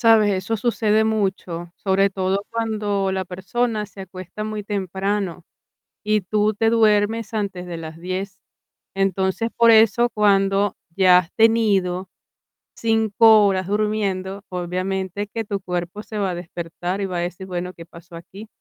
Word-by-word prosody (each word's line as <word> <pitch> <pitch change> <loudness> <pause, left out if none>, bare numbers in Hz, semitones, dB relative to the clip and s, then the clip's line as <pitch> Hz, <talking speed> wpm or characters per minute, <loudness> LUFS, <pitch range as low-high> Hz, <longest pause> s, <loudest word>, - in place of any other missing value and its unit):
Sabes, 225 -3 +5
eso 190 +4 -1
sucede 220 -1 +1
mucho, 190 -5 -2
sobre 195 0 +2
todo 195 +1 -2
cuando 210 -4 -1
la 190 0 -2
persona 210 +5 -2
se 195 -1 -10
acuesta 185 +2 -8
muy 215 -1 -4
temprano 195 -2 -2 0.6
y 215 -1 +2
tú 210 +2 0
te 225 +1 +2
duermes 220 0 +2
antes 195 -4 -3
de 170 -1 -5
las 160 0 -8
10, 190 +2 -5 0.5
entonces, 195 +3 0
por 235 -1 +6
eso 225 +2 +5
cuando 200 -1 +2 0.2
ya 185 -1 +6
has 180 -1 +1
tenido 200 -5 +2 0.6
5 220 -1 +4
horas 190 -2 0
durmiendo, 200 -2 -1
obviamente 185 +2 -3
que 225 +1 -4
tu 200 -1 -3
cuerpo 180 +2 -4
se 215 -1 -6
va 195 -2 0
a 175 - -3
despertar 175 +2 -5
y - - 0
va 185 -2 -3
a - - -1
decir: 175 +2 -4
"Bueno, 180 0 -4
¿qué 165 - -11
pasó 170 0 -14
aquí?". 190 +6 -11
195 Hz, 150 wpm, -22 LUFS, 185-215 Hz, 0.6 s, por